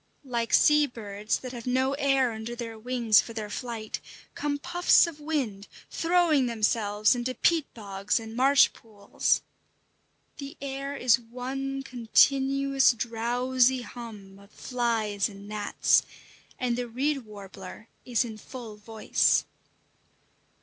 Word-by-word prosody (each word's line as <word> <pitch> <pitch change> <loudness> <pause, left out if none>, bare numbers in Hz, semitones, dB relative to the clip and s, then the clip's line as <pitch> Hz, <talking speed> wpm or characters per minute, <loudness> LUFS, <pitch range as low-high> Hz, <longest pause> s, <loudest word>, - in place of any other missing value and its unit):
Like 235 -3 -2
sea 300 -1 +5
birds 210 -3 -3
that 255 - -6
have 240 -1 -8
no 260 +2 +1
air 270 -3 +2
under 220 +2 -6
their 235 -2 -6
wings 235 -1 +3
for 230 - -10
their 215 -2 -5
flight, 230 -2 -5 0.3
come 290 -1 -2
puffs 350 +5 +4
of 330 -3 -8
wind, 265 -10 -3 0.2
throwing 330 -6 +2
themselves 215 -2 +1
into 250 +1 -3
peat 330 -4 +1
bogs 200 -1 -2
and 225 0 -9
marsh 275 +3 +5
pools. 205 -3 -1 0.9
The 280 +3 -8
air 275 0 -5
is 245 -2 +4
one 265 +3 -5
continuous 270 +2 +3
drowsy 245 +2 +1
hum 210 -6 -10
of 200 0 -18
flies 225 -5 -1
and 200 0 -12
gnats; 210 0 +2 0.6
and 245 -2 -1
the 245 0 -3
reed 275 +5 -1
warbler 200 -1 -11 0.2
is 245 -1 0
in 220 -2 -8
full 230 -3 -9
voice. 220 +1 +1
240 Hz, 130 wpm, -27 LUFS, 220-270 Hz, 0.9 s, sea